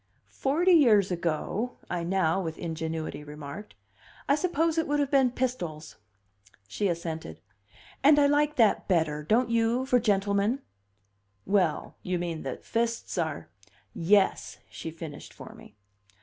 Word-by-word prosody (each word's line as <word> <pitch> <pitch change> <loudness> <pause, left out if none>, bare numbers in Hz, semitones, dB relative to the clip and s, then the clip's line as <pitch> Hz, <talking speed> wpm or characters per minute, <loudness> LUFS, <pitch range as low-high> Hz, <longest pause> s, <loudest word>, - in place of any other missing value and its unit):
"Forty 325 +7 +2
years 220 - +5
ago," 175 +8 -2
I 175 -1 -3
now, 180 0 +1
with 160 -3 -5
ingenuity, 160 -2 -4
remarked, 150 +6 -9 0.5
"I - - +4
suppose 330 0 +1
it 325 - -1
would 295 0 +1
have 285 -1 0
been 270 -3 +4
pistols." 180 -12 -4 0.7
She 200 - -1
assented. 165 - -4 0.6
"And 295 +1 +7
I 290 - +5
like 295 +1 +2
that 225 -4 +3
better 160 -5 +1
don't 225 +9 +1
you 230 +2 +1
for 250 -2 +3
gentlemen?" 205 +3 +1 0.8
"Well, 185 -6 0
you 180 0 -2
mean 170 -2 -4
that 135 - -6
fists 230 0 -2
are 160 -3 -3 0.3
" 100 -1 -39 0.2
"Yes," 195 -2 +1
she - - -6
finished 160 -2 -9
for - - -11
me. - - -16
200 Hz, 140 wpm, -28 LUFS, 160-255 Hz, 0.8 s, And